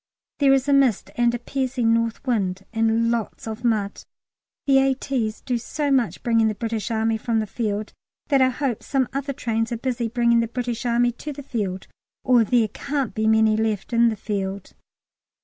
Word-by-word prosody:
There 280 -2 +5
is 270 0 +3
a 285 - +3
mist 270 -6 +2
and 240 0 +2
a - - -1
piercing 250 -2 0
north 230 +3 -1
wind, 195 -6 -1
and 225 +1 +2
lots 230 -2 -3
of 220 +2 -6
mud. 215 -4 0 0.6
The 270 -1 +5
A.T.'s 265 -4 -1
do 245 -2 -1
so 290 +4 -2
much 255 -4 +1
bringing 230 -2 +3
the 215 - -1
British 225 -1 -3
Army 225 0 0
from 230 0 -1
the 215 - -1
field 210 -1 -3 0.4
that 275 -3 +4
I 260 - +5
hope 255 -3 -2
some 265 -3 0
other 280 +1 -2
trains 225 -4 -2
are 235 - -1
busy 240 -1 -2
bringing 235 0 +2
the 230 - +1
British 245 0 -3
Army 240 +1 +3
to 300 - -4
the 285 +1 -9
field, 200 -8 -3 0.4
or 250 -3 +5
there 225 0 +2
can't 275 0 -3
be 220 +1 0
many 220 0 +4
left 220 0 -1
in 235 0 +5
the 220 - -2
field. 200 -2 -4
235 Hz, 190 wpm, -23 LUFS, 220-255 Hz, 0.6 s, There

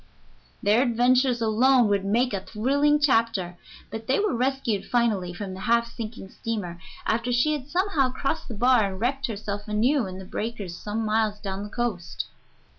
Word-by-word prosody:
Their 210 +4 +4
adventures 250 0 +3
alone 240 +2 +4
would 200 -1 +1
make 230 +5 +1
a 195 - 0
thrilling 285 +8 +2
chapter, 225 -10 +1 0.3
but 225 0 -6
they 265 - +2
were 420 0 +1
rescued 250 -5 0
finally 220 -7 +1
from 190 +1 -6
the 185 - -8
half 235 +3 +1
sinking 220 -3 -7
steamer, 200 -7 -4 0.3
after 230 +2 0
she 245 +6 +3
had 280 -3 -4
somehow 335 -7 +1
crossed 290 +5 -2
the 235 - -6
bar 245 +1 +4
and 190 - -7
wrecked 270 +4 0
herself 205 -2 -5
anew 230 +4 +2
in 185 0 -7
the 190 - -8
breakers 205 -3 -4
some 215 +4 -3
miles 215 -1 +1
down 195 -2 -4
the 205 - -6
coast. 210 -7 -3
230 Hz, 175 wpm, -25 LUFS, 205-255 Hz, 0.3 s, Their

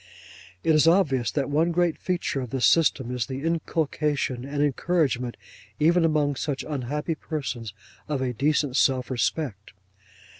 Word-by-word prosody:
It 160 - +3
is 155 +1 +4
obvious 150 - +3
that 140 -3 -1
one 160 +4 +2
great 175 -1 +1
feature 175 -6 -2
of 125 - -5
this 130 0 +1
system, 135 -6 +3
is 120 -3 -2
the 135 +1 -5
inculcation 150 -5 -1
and 145 +1 -1
encouragement, 140 -4 0 0.4
even 170 +3 +4
among 150 -3 +1
such 140 -3 -3
unhappy 150 +3 -2
persons, 135 -8 -5 0.4
of 145 -2 -1
a 130 -1 -1
decent 140 +1 +1
self 130 -1 +2
respect. 120 - -2
145 Hz, 145 wpm, -25 LUFS, 130-160 Hz, 0.4 s, is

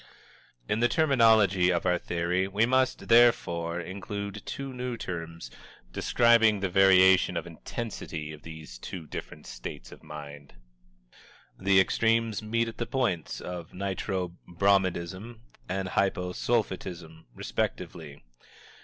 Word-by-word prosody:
In 105 - 0
the 120 - +4
terminology 110 - +4
of 85 -1 -1
our 90 -1 +2
theory 85 +2 -1
we 100 +3 +2
must, 130 +1 +1
therefore, 85 -8 +3
include 100 +3 -6
two 135 -1 -5
new 125 -1 -4
terms, 85 - -6 0.4
describing 115 - +4
the 95 -2 -2
variation 95 0 +5
of - - -3
intensity 80 -9 -6
of 75 - -12
these 80 -6 -10
two 85 +3 -7
different - - -8
states - - -8
of - - -13
mind. 75 -2 -10 1.0
The 95 0 +4
extremes 115 +1 +2
meet 115 +2 0
at 115 - -7
the 120 - -2
points 115 - -1
of 90 -2 -7
Nitro 95 -2 -3
Bromidism 95 +3 0 0.3
and 95 0 -2
Hypo 90 -2 0
Sulphitism, 90 - -3
respectively. 70 +3 -4
95 Hz, 120 wpm, -28 LUFS, 85-115 Hz, 1.0 s, variation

